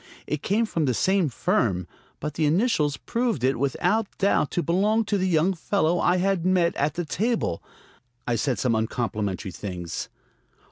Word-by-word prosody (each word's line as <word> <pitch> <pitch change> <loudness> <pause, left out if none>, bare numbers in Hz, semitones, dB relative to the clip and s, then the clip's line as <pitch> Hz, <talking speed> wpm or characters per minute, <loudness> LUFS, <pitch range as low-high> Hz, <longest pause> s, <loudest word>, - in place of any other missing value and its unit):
It 150 -1 -3
came 220 +4 +1
from 165 -7 -1
the 125 -3 +1
same 190 - +2
firm, 115 - 0 0.3
but 150 0 -4
the 155 0 +1
initials 155 - +2
proved 230 - -1
it 130 -2 +2
without 180 - +1
doubt 195 -6 +2
to 175 - -1
belong 210 +6 +2
to 205 - 0
the 190 -1 +1
young 175 +2 +2
fellow 175 -1 0
I 180 +1 +3
had 190 -1 +1
met 180 -2 +2
at 145 +3 0
the 175 -1 -2
table. 215 - -1 0.6
I 120 - 0
said 125 +2 0
some 125 -3 +1
uncomplimentary 110 -4 -2
things. 90 -3 -5
165 Hz, 170 wpm, -25 LUFS, 125-195 Hz, 0.6 s, I